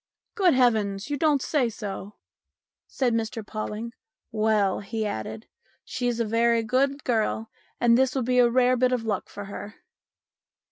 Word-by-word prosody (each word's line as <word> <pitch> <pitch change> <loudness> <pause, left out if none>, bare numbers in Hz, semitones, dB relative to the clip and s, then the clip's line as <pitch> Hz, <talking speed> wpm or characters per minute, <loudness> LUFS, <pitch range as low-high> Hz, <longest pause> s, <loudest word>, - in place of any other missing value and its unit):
" - - -61
Good 370 - +3
heavens! 220 -3 +1
you - - +1
don't 290 -2 +2
say 270 -6 +1
so? 205 -2 -7 0.4
" - - -66 0.3
said 250 -3 0
Mr 225 -1 -2
Pawling. 215 +2 -5 0.4
"Well," 215 -3 +1
he 215 +2 -3
added, 210 - -5 0.4
"she's 245 -2 -2
a 230 - +1
very 230 +1 +2
good 270 +4 0
girl, 220 -1 -1 0.3
and 235 -1 +5
this 260 +1 +2
will 265 - 0
be 250 +1 +2
a 240 -1 +6
rare 250 +1 +3
bit 255 0 +2
of 250 -2 0
luck 205 -4 -2
for 205 - -8
her." 205 +1 -8
230 Hz, 170 wpm, -26 LUFS, 215-255 Hz, 0.4 s, a